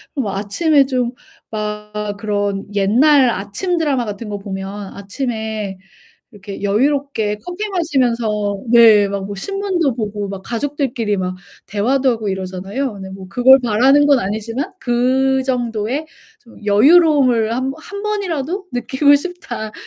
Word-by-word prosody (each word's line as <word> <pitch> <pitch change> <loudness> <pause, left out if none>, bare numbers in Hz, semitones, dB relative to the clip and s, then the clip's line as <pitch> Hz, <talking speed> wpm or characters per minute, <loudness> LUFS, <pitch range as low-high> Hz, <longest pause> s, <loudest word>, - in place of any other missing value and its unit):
뭐 215 -9 -2
아침에 275 +9 +2
좀 250 -2 -1 0.4
막 210 -1 -4
그런 205 -1 -2
옛날 255 +7 +4
아침 215 - -2
드라마 275 -7 0
같은 210 +1 -6
거 205 - -3
보면 195 0 -6
아침에 215 -2 -4 0.6
이렇게 200 -1 -9
여유롭게 225 0 0
커피 370 +4 -4
마시면서 235 - 0
네 220 -4 +7
막 195 -1 -4
뭐 205 - -6
신문도 365 - -1
보고 205 -3 -3
막 195 -1 -6
가족들끼리 250 -4 -2
막 185 0 -3 0.3
대화도 255 +7 +1
하고 220 -4 0
이러잖아요. 190 +7 -4
근데 190 -1 -8
뭐 190 0 -9
그걸 260 +5 +6
바라는 260 +6 +4
건 280 -3 +4
아니지만 230 - -3
'그 260 +2 +1
정도의 245 +2 -2 0.3
좀 230 -4 -17
여유로움을 255 -1 +4
1 260 +2 -1
번 - - -12
1 400 +3 -7
번이라도 380 -3 -2
느끼고 265 +4 +3
싶다.' 250 -11 -6
235 Hz, 285 characters per minute, -18 LUFS, 205-275 Hz, 0.6 s, 네